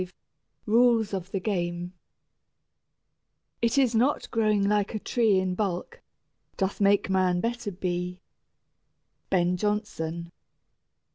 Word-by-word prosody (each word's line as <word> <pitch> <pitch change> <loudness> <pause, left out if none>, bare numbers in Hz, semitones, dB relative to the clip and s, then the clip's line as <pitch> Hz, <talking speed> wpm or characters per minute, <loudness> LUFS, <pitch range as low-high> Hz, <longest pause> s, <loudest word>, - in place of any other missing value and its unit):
V 185 0 -6 0.5
RULES 230 -1 +3
OF 185 -1 -3
THE 195 - -2
GAME 175 -3 -2 1.7
It 235 +4 +1
is 260 -4 +4
not 250 +6 +1
growing 215 -3 +2
like 205 +1 +1
a - - -1
tree 220 -3 +2
In 185 -1 0
bulk, 200 - -3 0.6
doth 195 +1 -1
make 200 0 +4
man 185 -2 +2
better 235 0 -2
be. 180 0 -3 1.1
BEN 180 -1 +2
JONSON. 170 -5 -2
200 Hz, 115 wpm, -27 LUFS, 180-220 Hz, 1.7 s, is